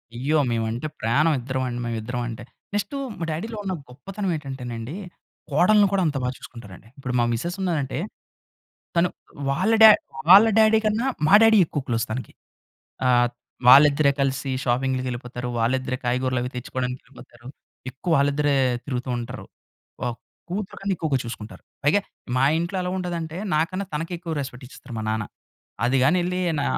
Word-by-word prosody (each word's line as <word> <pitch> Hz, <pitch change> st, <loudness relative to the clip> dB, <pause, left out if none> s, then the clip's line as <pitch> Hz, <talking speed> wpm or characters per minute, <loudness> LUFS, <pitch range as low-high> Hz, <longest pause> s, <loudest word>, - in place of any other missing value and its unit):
అయ్యో! 145 Hz, +6 st, +1 dB
మేవంటే 115 Hz, +4 st, -2 dB
ప్రాణం, 145 Hz, +9 st, +3 dB
ఇద్దరవండి 130 Hz, -1 st, -3 dB
మేవిద్దరమంటే. 120 Hz, +1 st, -4 dB, 0.3 s
నెక్స్టు 205 Hz, +6 st, -2 dB, 0.2 s
మా 170 Hz, -, -2 dB
డ్యాడీలో 215 Hz, +9 st, -4 dB
ఉన్న 190 Hz, -, -1 dB, 0.2 s
గొప్పతనం 190 Hz, +9 st, -5 dB
ఏటంటే‌నండి, 130 Hz, -2 st, -6 dB, 0.6 s
కోడలుని 200 Hz, +8 st, +5 dB
కూడా 195 Hz, -, +2 dB
అంత 145 Hz, -2 st, -1 dB
బా 125 Hz, -, 0 dB
చూసుకుంటారండి. 110 Hz, -4 st, -12 dB
ఇప్పుడు 130 Hz, -2 st, -5 dB
మా 120 Hz, -, +3 dB
మిసెసున్నారంటే 170 Hz, -, -2 dB, 1.0 s
తను 170 Hz, +1 st, +4 dB, 0.4 s
వాళ్ళ 180 Hz, +11 st, +1 dB
డ్యా 220 Hz, -, +12 dB, 0.4 s
వాళ్ళ 200 Hz, +4 st, +10 dB
డ్యాడీ 220 Hz, 0 st, +6 dB
కన్నా 215 Hz, +4 st, +1 dB, 0.2 s
మా 185 Hz, -, +5 dB
డ్యాడీ 225 Hz, -1 st, +6 dB
ఎక్కువ 150 Hz, -, -3 dB
క్లోజ్ 115 Hz, -1 st, 0 dB
తనకి. 125 Hz, +3 st, -5 dB, 0.7 s
ఆహ్, 120 Hz, -1 st, +4 dB, 0.4 s
వాళ్ళిద్దరే 140 Hz, +2 st, +7 dB
కలిసి 135 Hz, 0 st, 0 dB
షాపింగులకెళ్ళిపోతారు. 125 Hz, -1 st, -2 dB
వాళ్ళిద్దరే 130 Hz, +2 st, 0 dB
కాయగూరలవి 125 Hz, 0 st, 0 dB
తెచ్చుకోడానికెళ్ళిపోతారు. 125 Hz, 0 st, -6 dB, 0.4 s
ఎక్కువ 160 Hz, +5 st, 0 dB
ఆళ్ళిద్దరే 145 Hz, +1 st, +2 dB, 0.3 s
తిరుగుతూ 130 Hz, -2 st, -3 dB
ఉంటారు. 120 Hz, +2 st, -6 dB, 0.6 s
వావ్! 120 Hz, -1 st, -2 dB, 0.3 s
కూతురు 190 Hz, +2 st, -4 dB
కన్నా 195 Hz, 0 st, 0 dB
ఎక్కువగా 150 Hz, -4 st, 0 dB
చూసుకుంటారు. 115 Hz, -2 st, -8 dB, 0.2 s
పైగా 180 Hz, +8 st, +3 dB, 0.3 s
మా 130 Hz, -, +2 dB
ఇంట్లో 170 Hz, +3 st, -2 dB
ఎలా 180 Hz, -, -2 dB
ఉంటదంటే 170 Hz, -2 st, -4 dB, 0.2 s
నాకన్నా 185 Hz, +5 st, 0 dB
తనకే 165 Hz, +4 st, -3 dB
ఎక్కువ 165 Hz, -1 st, -5 dB
రెస్పెక్టిచ్చేస్తరు 130 Hz, -1 st, -10 dB
మా 110 Hz, -, -3 dB
నాన్న. 110 Hz, -1 st, -1 dB, 0.6 s
అది 125 Hz, +3 st, +2 dB
గాని 150 Hz, +7 st, +4 dB
ఎళ్లి 180 Hz, +1 st, -2 dB, 0.2 s
నా -, -, 0 dB
135 Hz, 135 wpm, -24 LUFS, 125-170 Hz, 1.0 s, డ్యా